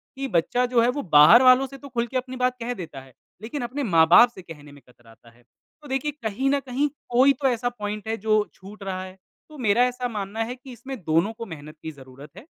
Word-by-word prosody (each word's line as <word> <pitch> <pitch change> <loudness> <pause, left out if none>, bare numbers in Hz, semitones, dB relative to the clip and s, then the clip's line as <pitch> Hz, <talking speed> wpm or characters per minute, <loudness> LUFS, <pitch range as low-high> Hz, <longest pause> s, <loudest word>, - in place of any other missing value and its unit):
कि 270 0 -4
बच्चा 245 +5 +1
जो 245 -1 +2
है 240 - +3
वो 285 +3 -2
बाहर 150 +11 +8
वालों 255 +1 +6
से 275 - -12
तो 280 0 -12
खुलके 240 +2 -2
अपनी 255 0 -5
बात 250 0 0
कह 240 +2 -3
देता 160 - -9
है, 130 -1 -18 0.3
लेकिन 240 +6 -5
अपने 265 +4 -4
माँ-बाप 175 +4 +6
से - - -10
कहने 150 -4 -13
में 145 -1 -16
कतराता 115 -1 -20
है। 120 +1 -25 0.4
तो 295 - -13
देखिए, 270 +3 -2
कहीं 265 -2 -3
न 280 0 +2
कहीं 270 +2 -1 0.2
कोई 260 +3 +4
तो 275 +1 -1
ऐसा 245 -1 0
पॉइंट 210 -2 -6
है 225 0 -2
जो 215 0 +1
छूट 200 +2 -13
रहा 185 -1 -4
है, 185 0 -11 0.3
तो 305 - -13
मेरा 235 -1 +2
ऐसा 250 0 -4
मानना 215 -1 -4
है 240 +2 -6
कि 255 +1 -14
इसमें 260 +3 -8
दोनों 165 +8 +1
को 230 +1 -8
मेहनत 155 -3 -11
की 160 - -5
ज़रूरत 135 0 -15
है। 265 - -12
230 Hz, 240 wpm, -24 LUFS, 170-255 Hz, 0.4 s, बाहर